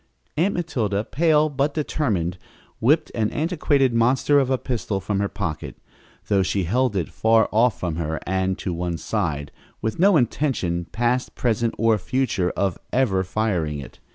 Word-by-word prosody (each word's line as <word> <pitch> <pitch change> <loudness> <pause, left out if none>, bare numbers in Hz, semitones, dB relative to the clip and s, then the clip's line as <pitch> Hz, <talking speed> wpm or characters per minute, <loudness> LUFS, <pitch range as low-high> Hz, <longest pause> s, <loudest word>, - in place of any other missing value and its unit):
Aunt 180 +7 +1
Matilda, 110 - -1
pale 155 +3 +3
but 145 0 -1
determined, 100 - -1 0.4
whipped 155 +7 +2
an 110 -2 0
antiquated 145 -5 +1
monster 130 +5 +3
of 135 -2 +1
a 130 - +2
pistol 115 -6 -2
from 95 +1 -2
her 100 - +1
pocket, 80 -3 -4 0.5
though 100 -2 +3
she 95 +1 0
held 120 +5 +1
it 85 -6 0
far 110 0 +3
off 115 +1 +3
from 85 -3 -2
her 80 -2 -2
and 95 0 0
to 90 - -3
one 85 0 -2
side, 80 -8 -2 0.3
with 110 +5 -3
no 195 -1 +6
intention, 120 - 0
past, 120 +5 -1
present 115 -1 0
or 115 -1 +3
future, 105 -4 0
of 95 -3 0
ever 105 -8 +2
firing 90 -6 -1
it. 70 - -10
110 Hz, 160 wpm, -23 LUFS, 95-135 Hz, 0.5 s, no